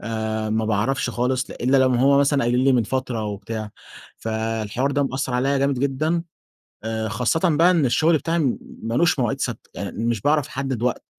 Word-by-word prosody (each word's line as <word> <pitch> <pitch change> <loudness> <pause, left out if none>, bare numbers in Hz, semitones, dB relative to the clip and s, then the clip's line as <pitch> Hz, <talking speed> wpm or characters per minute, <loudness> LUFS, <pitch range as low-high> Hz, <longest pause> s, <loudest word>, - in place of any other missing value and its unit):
آآ، 110 0 -3
ما 110 0 0
باعرفش 110 +5 0
خالص 125 +2 -1
إلا 130 +3 +1
لو 130 0 +4
هم 135 +3 +4
مثلًا 140 -1 +2
قايلين 125 +2 +2
لي 135 - +5
من 125 -3 +3
فترة 125 -2 -2
و 105 -1 -3
بتاع، 110 +1 -6 0.5
فالحوار 110 +3 -2
ده 145 0 +1
مأثّر 130 -1 -2
عليَّ 135 +3 +1
جامد 140 -1 +1
جدًا، 155 +5 0 0.6
آآ، 110 0 -2
خاصةً 115 +7 0 0.2
بقى 170 +3 +5
إن 165 -6 +3
الشغل 160 +6 +3
بتاعي 165 +3 -1
م 135 -6 +1 0.2
مالوش 135 +10 +1
مواعيد 120 -4 0
ثابتة، - - -4
يعني 110 - -5
مش 115 -3 0
باعرف 145 +2 +1
احدّد 135 -3 -3
وقت، 125 0 -1
125 Hz, 190 wpm, -22 LUFS, 110-140 Hz, 0.6 s, لي